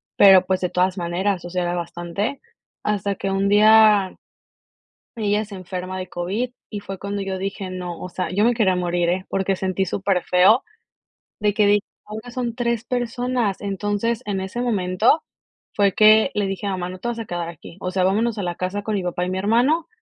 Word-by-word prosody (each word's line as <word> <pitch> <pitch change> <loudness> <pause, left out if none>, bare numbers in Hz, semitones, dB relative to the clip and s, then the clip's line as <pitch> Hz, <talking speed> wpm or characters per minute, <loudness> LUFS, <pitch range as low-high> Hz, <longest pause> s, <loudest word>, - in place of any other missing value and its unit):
pero, 190 -2 +7
pues, 185 0 0
de 180 - 0
todas 185 +2 +1
maneras, 180 +2 -1
o 175 - -7
sea, 180 0 -1
era 175 0 -1
bastante. 175 +8 -3 0.4
Hasta 205 -1 -1
que 195 - -3
un 195 +1 +1
día, 210 -2 +6 1.0
ella 210 -1 0
se 205 -1 -11
enferma 185 0 -5
de 185 -1 -6
COVID, 195 +9 -3 0.2
y 210 - -5
fue 195 -1 -7
cuando 200 +1 -4
yo 190 -1 -3
dije: 195 0 -4
"No" 180 -2 -6
o 180 - -6
sea, 185 -2 -3
yo 205 +3 +2
me 240 +1 +3
quería 205 -5 +2
morir, 175 -1 0
¿eh?, 185 +2 -1
porque 195 0 0
sentí 190 +1 -1
súper 190 0 0
feo, 190 +7 +4 0.8
de 210 -1 +1
que 210 - +4
dije: 205 0 +3 0.2
"Ahora 220 +3 -8
son 240 -2 -3
3 235 -1 -1
personas". 245 -3 -1
Entonces, 205 +3 -2
en 200 -2 -2
ese 190 +6 -4
momento 215 - +2 0.5
fue 200 -2 +2
que 215 +4 +6
le 205 -1 +1
dije 195 +1 -3
a - - 0
mamá: 180 -1 -3
"No 185 0 -8
te 240 - -5
vas 240 -1 -2
a 225 - -4
quedar 175 -3 -4
aquí. 170 +1 -12
O 185 - -2
sea, 185 0 0
vámonos 215 +4 +1
a 205 - -2
la 175 -1 -2
casa 185 +3 -3
con 215 - -2
mi 195 - -1
papá 180 0 -2
y - - -3
mi 185 - -2
hermano", 245 - +2
195 Hz, 210 wpm, -22 LUFS, 185-215 Hz, 1.0 s, pero